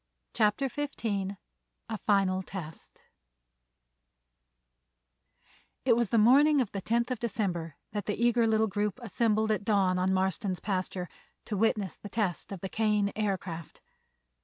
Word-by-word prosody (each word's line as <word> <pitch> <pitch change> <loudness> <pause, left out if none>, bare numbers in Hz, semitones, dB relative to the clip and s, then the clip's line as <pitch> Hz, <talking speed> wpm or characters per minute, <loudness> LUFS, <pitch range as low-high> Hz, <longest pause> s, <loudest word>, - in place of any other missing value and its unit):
CHAPTER 215 +6 +2
XV 280 0 -5 0.8
A 225 -1 -3
FINAL 195 -2 +3
TEST 175 -4 -9 2.8
It 240 -3 +5
was 235 -3 +1
the 230 - +2
morning 280 +7 +6
of 240 -6 0
the 195 - -4
tenth 235 +4 0
of 250 - -2
December 180 -9 -2 0.2
that 205 -1 -4
the 210 - 0
eager 235 -1 +3
little 220 0 +3
group 210 +2 -2
assembled 220 0 +1
at 210 - 0
dawn 195 -3 +2
on 185 +1 +2
Marston's 190 0 0
pasture 185 -2 -2 0.4
to 210 - -3
witness 205 -3 +1
the 205 - -9
test 200 -5 -2
of 195 -3 -6
the 190 - -3
Kane 210 -2 +1
Aircraft. 190 -6 -3
210 Hz, 135 wpm, -29 LUFS, 190-225 Hz, 2.8 s, morning